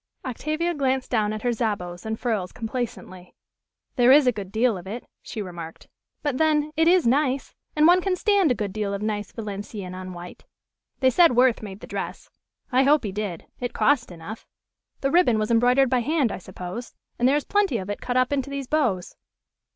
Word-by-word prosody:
Octavia 310 +7 -2
glanced 265 -3 -1
down 215 -3 +1
at 215 0 -5
her 245 - +2
jabots 205 -5 -3
and 220 0 -3
frills 215 -7 -1
complacently. 220 -6 -6 0.6
"There 245 0 +6
is 285 +1 +7
a 250 - +5
good 200 -4 -7
deal 225 +1 +2
of 180 0 -8
it," 230 +5 -6 0.2
she 215 -3 -6
remarked; 170 -3 -9 0.4
"but 285 -4 -1
then, 305 -1 +2
it 320 +1 +3
is 360 0 +5
nice, 270 +2 +1 0.2
and 305 0 +4
one 355 +2 +6
can 380 0 0
stand 395 -2 +3
a - - +2
good 205 -4 -3
deal 205 -2 -2
of 200 - -5
nice 210 -1 -2
Valenciennes 205 -3 -6
on 185 0 -7
white. 175 0 -10 0.6
They 260 -1 +5
said 330 0 +5
Worth 250 -1 +4
made 205 -2 -8
the - - -8
dress. - - -6 0.4
I 255 +1 +4
hope 285 +2 +4
he 205 - -3
did. 200 -4 -4
It 245 0 -3
cost 260 -8 +2
enough. 175 +6 -9 0.5
The 275 - +1
ribbon 340 -10 +4
was 215 +1 -1
embroidered 250 +3 +4
by 255 - +3
hand, 275 -1 +1
I - - -5
suppose. 185 +5 -8 0.2
And 245 - +4
there 275 - +4
is 295 - -2
plenty 405 - +1
of 190 -3 -5
it 205 - -5
cut 250 0 -1
up 255 +2 +2
into 275 -1 -1
these 280 -1 -4
bows." 240 - 0
240 Hz, 205 wpm, -24 LUFS, 205-280 Hz, 0.6 s, is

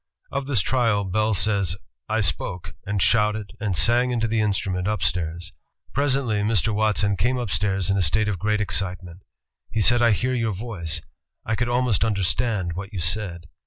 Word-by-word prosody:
Of 140 0 -3
this 130 -8 +2
trial 115 -4 +1
Bell 105 +3 0
says: 100 -3 +1 0.3
*'I 110 +1 +1
spoke, 90 -1 -1
and 100 0 -1
shouted, 105 +1 +2
and 100 -5 -1
sang 120 +10 +4
into 115 -2 0
the 110 0 +1
instrument 95 -3 -1
up 105 -4 -1
stairs. 85 0 -2 0.4
Presently 135 -5 +1
Mr. 110 0 +1
Watson 105 -1 +1
came 120 +8 0
upstairs 95 -4 0
in 100 - +1
a - - +2
state 105 +7 +2
of 100 -4 -2
great 105 +2 0
excitement. 90 -3 -2 0.5
He 110 - -2
said: 120 +4 +5
'I 115 -2 +5
hear 125 +5 0
your 115 -4 0
voice; 95 -6 -3 0.4
I 110 - -1
could 120 +1 -1
almost 120 -5 +2
understand 100 -2 0
what 100 +4 -6
you 100 - -5
said!' 85 -1 -1
105 Hz, 175 wpm, -23 LUFS, 95-115 Hz, 0.5 s, said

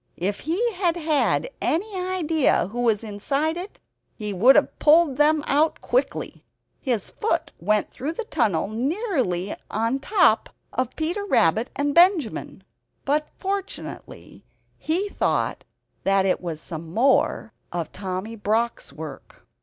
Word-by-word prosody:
If 200 +4 -2
he 390 - 0
had 355 -3 +1
had 315 - +1
any 395 +6 -1
idea 330 - +1
who 240 +3 -3
was 225 -3 +2
inside 275 +10 -1
it 365 +4 -7 0.4
he 210 -2 -4
would 235 +9 +6
have 295 - +2
pulled 305 -3 +5
them 300 0 +4
out 305 +3 +2
quickly. - - -2 0.4
His 240 -7 -1
foot 335 -7 -1
went 210 +4 +1
through 295 +5 -4
the 465 - -4
tunnel 220 - 0
nearly 250 - -1
upon 225 +3 -2
the 270 - 0
top 355 - +3 0.2
of 255 0 -2
Peter 340 +6 -2
Rabbit 225 - +2
and 285 0 0
Benjamin; 335 - +3 0.4
but, 300 +2 +1
fortunately, 390 0 -6 0.4
he 355 +6 0
thought - - -1 0.4
that 195 -1 +3
it 185 - +1
was 165 -4 -4
some 160 0 -7
more 235 0 +2 0.2
of 170 -2 -3
Tommy 190 +3 -5
Brock's 220 0 -1
work. 155 +1 -10
270 Hz, 140 wpm, -24 LUFS, 205-335 Hz, 0.4 s, would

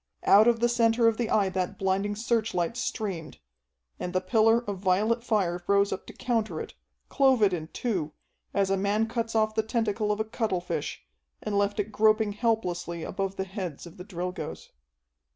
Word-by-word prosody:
Out 210 +3 +6
of 235 -1 +3
the 240 - +5
center 230 -1 +3
of 225 -1 +2
the 235 -2 -1
Eye 200 -3 +3
that 185 -1 -2
blinding 195 +2 0
searchlight 220 -4 0
streamed. 195 -8 -4 0.6
And 180 - -4
the 185 - +2
pillar 225 +4 +3
of 200 -2 -3
violet 210 +5 +1
fire 185 -7 0
rose 200 0 +3
up - - -7
to - - -9
counter 230 -3 -1
it, - - -7 0.3
clove 265 -5 +3
it 195 -2 +4
in 160 -3 -3
two, 180 -8 -2 0.4
as 195 -1 +1
a 195 - +2
man 205 +3 +1
cuts 230 -1 -3
off 215 0 +2
the 220 - +2
tentacle 215 -2 -1
of 210 - -1
a 220 - 0
cuttlefish, 180 - -3 0.4
and 210 - -2
left 200 +1 +1
it 205 +1 -1
groping 215 0 +3
helplessly 180 -7 -1
above 195 0 -3
the 190 - -2
heads 185 -6 -6
of 170 - -12
the 180 - -8
Drilgoes. 180 -4 -6
205 Hz, 185 wpm, -27 LUFS, 185-225 Hz, 0.6 s, Out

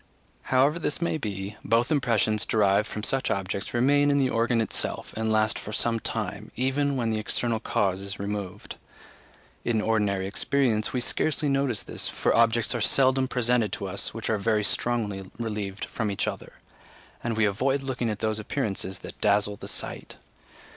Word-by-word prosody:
However 140 +5 +3
this 150 - -1
may 170 -2 -1
be, 100 -3 -5
both 115 +5 +2
impressions 115 -6 +2
derived 105 0 +2
from 105 - -5
such 135 +3 +1
objects 100 0 -2
remain 145 +4 +3
in 140 - +3
the 130 -2 +2
organ 115 +1 +2
itself, 110 - -1
and 110 0 -1
last 110 0 +2
for 105 - -7
some 115 +2 +2
time, 110 -1 -4
even 135 +2 0
when 115 -3 0
the 110 - 0
external 115 +1 0
cause 100 -5 0
is 100 0 -5
removed. 100 -2 -5 0.9
In 115 -2 +1
ordinary 105 -3 +1
experience 110 +2 +1
we 125 - -1
scarcely 150 +3 +1
notice 135 -5 +1
this, - - -3
for - - +1
objects 115 0 +3
are 120 - -2
seldom 130 +3 +4
presented 125 -3 +1
to - - -3
us 95 +1 -3
which 115 0 -5
are 110 -2 +1
very 105 +1 +1
strongly 100 -4 -1
relieved 105 -4 -4
from 115 -3 -3
each 100 - -1
other, - - -5 0.7
and 115 -2 -2
we 110 - +4
avoid 135 +7 +1
looking 125 -3 -2
at 105 - -2
those 110 -1 0
appearances 105 -5 -3
that - - -10
dazzle 105 0 +3
the - - -8
sight. - - -3
110 Hz, 175 wpm, -26 LUFS, 105-125 Hz, 0.9 s, seldom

